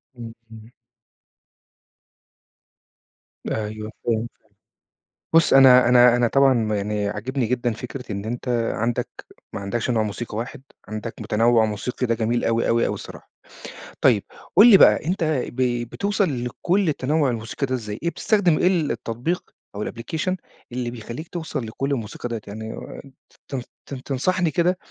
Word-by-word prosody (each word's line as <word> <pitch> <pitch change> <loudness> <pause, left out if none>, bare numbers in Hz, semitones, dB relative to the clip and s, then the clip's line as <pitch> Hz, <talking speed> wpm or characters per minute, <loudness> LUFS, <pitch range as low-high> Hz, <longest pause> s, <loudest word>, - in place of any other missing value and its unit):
امم، 115 -2 -8 0.2
امم. 110 +1 -13 2.8
أيوه 110 0 -4
فهمتك، 115 0 -1 1.0
بُصّ 165 - +5
أنا 130 -2 +8
أنا 125 -1 +6
أنا 120 -1 +2
طبعًا 125 -5 +3
يعني 105 0 -1
عاجبني 125 +5 -2
جدًا 120 0 0
فكرة 125 0 -7
إن 100 +1 -4
أنت 120 +3 -5 0.3
عندك 115 +2 -1 0.4
ما - - -5
عندكش 110 +5 -2
نوع 115 -3 +2
موسيقى 105 +1 -4
واحد، 125 +2 -6 0.3
عندك 110 +2 -5
متنوّع 115 +2 +3
موسيقي، 110 +4 -2
ده 115 - +1
جميل 115 +1 0
أوي 115 0 +1
أوي 115 0 +3
أوي - - -2
الصراحة. - - -11 0.7
طيب - - +4 0.3
قُل 205 +6 +9
لي 195 - +10
بقى، - - +5
أنت 175 +1 -1 0.3
ب 120 -2 0
بتوصل 200 - -1
لكُلّ 180 +9 0
التنوّع 145 0 +1
الموسيقي 115 +3 -3
ده 130 - -1
إزاي، 105 -3 -6
إيه 170 - +1
بتستخدم 180 -1 +2
إيه - - +2
التطبيق، 150 -2 -1 0.3
أو 100 - -4
الأبليكيشن 160 - -3 0.3
اللي 120 -1 -3
بيخلّيك 120 +6 -7
توصل 160 -7 -4
لكُلّ 135 +5 -3
الموسيقى 120 -1 -4
ديّة؟ 115 -1 -3
يعني 110 +2 -6 0.7
تن 135 -3 -4 0.2
تن 130 -2 -8
تنصحني 170 +5 0
كده، 180 +2 +1
120 Hz, 140 wpm, -23 LUFS, 110-140 Hz, 2.8 s, لي